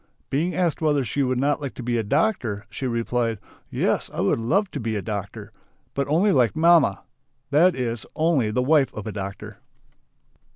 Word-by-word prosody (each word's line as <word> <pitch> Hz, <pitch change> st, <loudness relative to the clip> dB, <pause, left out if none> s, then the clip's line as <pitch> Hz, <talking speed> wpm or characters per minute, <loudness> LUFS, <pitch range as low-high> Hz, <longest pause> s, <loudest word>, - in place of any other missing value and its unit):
Being 160 Hz, +5 st, 0 dB
asked 170 Hz, -4 st, 0 dB
whether 150 Hz, -3 st, +2 dB
she 140 Hz, +4 st, -2 dB
would 130 Hz, -2 st, +1 dB
not 145 Hz, +3 st, +1 dB
like 140 Hz, -3 st, -5 dB
to 125 Hz, -, -7 dB
be 120 Hz, 0 st, -1 dB
a -, -, -1 dB
doctor, 120 Hz, -, 0 dB
she 130 Hz, +6 st, -4 dB
replied: 115 Hz, -1 st, -1 dB, 0.3 s
"Yes! -, -, 0 dB
I -, -, -6 dB
would -, -, +1 dB
love 185 Hz, -, +1 dB
to 145 Hz, -, -4 dB
be 110 Hz, -2 st, -2 dB
a 105 Hz, -, -2 dB
doctor! 105 Hz, 0 st, -5 dB, 0.4 s
But 140 Hz, -1 st, -1 dB
only 175 Hz, +8 st, +3 dB
like 125 Hz, -, +3 dB
mamma." 160 Hz, -, +4 dB, 0.5 s
That 170 Hz, +6 st, +4 dB
is, 120 Hz, -3 st, -3 dB
only 155 Hz, -8 st, +2 dB
the 125 Hz, +4 st, 0 dB
wife 145 Hz, 0 st, +3 dB
of 105 Hz, -, -6 dB
a 110 Hz, -, -4 dB
doctor. 100 Hz, -1 st, -7 dB
130 Hz, 190 wpm, -24 LUFS, 110-155 Hz, 0.5 s, mamma